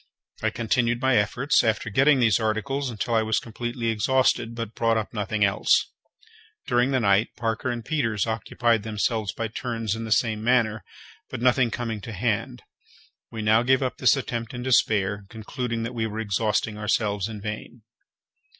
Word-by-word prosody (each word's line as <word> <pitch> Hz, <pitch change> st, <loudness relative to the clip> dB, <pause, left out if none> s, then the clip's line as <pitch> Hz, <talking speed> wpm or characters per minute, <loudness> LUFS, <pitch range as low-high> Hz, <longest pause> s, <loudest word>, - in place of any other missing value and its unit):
I -, -, +1 dB
continued 120 Hz, 0 st, 0 dB
my 130 Hz, 0 st, +2 dB
efforts, 120 Hz, +7 st, +2 dB
after 110 Hz, -1 st, 0 dB
getting 135 Hz, +5 st, +4 dB
these 115 Hz, -4 st, +3 dB
articles, 125 Hz, +5 st, -1 dB
until 120 Hz, +1 st, -3 dB
I 115 Hz, -, +4 dB
was 110 Hz, 0 st, 0 dB
completely 120 Hz, +1 st, -3 dB
exhausted, 115 Hz, +1 st, +1 dB
but 115 Hz, -1 st, -5 dB
brought 115 Hz, -1 st, +1 dB
up 110 Hz, +1 st, -3 dB
nothing 105 Hz, -1 st, 0 dB
else. 100 Hz, -, +2 dB, 0.7 s
During 120 Hz, +1 st, +2 dB
the 130 Hz, -1 st, +1 dB
night 100 Hz, 0 st, +3 dB
Parker 115 Hz, +2 st, -2 dB
and 120 Hz, -2 st, -4 dB
Peters 115 Hz, -9 st, 0 dB
occupied 115 Hz, 0 st, 0 dB
themselves 110 Hz, -1 st, -1 dB
by 115 Hz, -, -3 dB
turns 115 Hz, -2 st, -3 dB
in 115 Hz, 0 st, -4 dB
the 110 Hz, -, -6 dB
same 110 Hz, -1 st, +1 dB
manner; 115 Hz, -3 st, +2 dB, 0.5 s
but -, -, -5 dB
nothing 125 Hz, 0 st, +3 dB
coming 115 Hz, -2 st, -4 dB
to 115 Hz, -, -7 dB
hand, 95 Hz, -, -2 dB, 0.7 s
we 110 Hz, -1 st, -5 dB
now 110 Hz, +2 st, +4 dB
gave 130 Hz, +2 st, +2 dB
up 130 Hz, -, -2 dB
this -, -, +4 dB
attempt 120 Hz, -2 st, -4 dB
in 120 Hz, -, -5 dB
despair, 100 Hz, -5 st, +2 dB
concluding 115 Hz, +1 st, -4 dB
that 115 Hz, +2 st, -4 dB
we 115 Hz, -2 st, -1 dB
were 110 Hz, +1 st, -5 dB
exhausting 105 Hz, 0 st, -1 dB
ourselves 105 Hz, -2 st, 0 dB
in 110 Hz, -2 st, -7 dB
vain. 110 Hz, +2 st, -7 dB
115 Hz, 170 wpm, -25 LUFS, 110-120 Hz, 0.7 s, getting